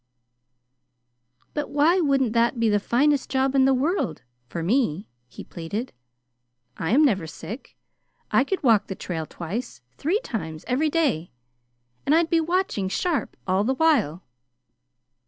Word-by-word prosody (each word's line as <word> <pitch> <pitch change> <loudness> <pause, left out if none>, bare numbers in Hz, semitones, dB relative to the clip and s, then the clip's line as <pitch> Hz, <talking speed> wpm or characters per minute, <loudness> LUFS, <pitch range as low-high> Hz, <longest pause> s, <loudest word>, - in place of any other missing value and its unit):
"But 295 -1 -3
why 300 +6 +3
wouldn't 275 -7 +2
that 235 +1 +2
be 230 -1 +3
the 205 0 +3
finest 280 +7 +1
job 265 0 +1
in 270 -1 +4
the 270 - +4
world 270 - -1 0.2
for 165 +5 -4
me?" 200 - +1 0.2
he - - -10
pleaded. 200 +9 -5 0.8
"I 160 - -3
am 290 +7 +5
never 195 - +1
sick. 220 - -9 0.5
I 260 - +4
could 375 +5 -3
walk 225 -6 +4
the 190 - -5
trail 160 -4 -4
twice, 175 - -6 0.2
three 355 +9 +1
times 160 - -5
every 280 +5 +1
day, 280 - 0 0.7
and 295 - +3
I'd 330 0 +2
be 330 -1 +4
watching 335 - 0
sharp 330 - -1
all 190 +1 +2
the 260 +5 0
while." 250 - +2
250 Hz, 145 wpm, -24 LUFS, 190-295 Hz, 0.8 s, am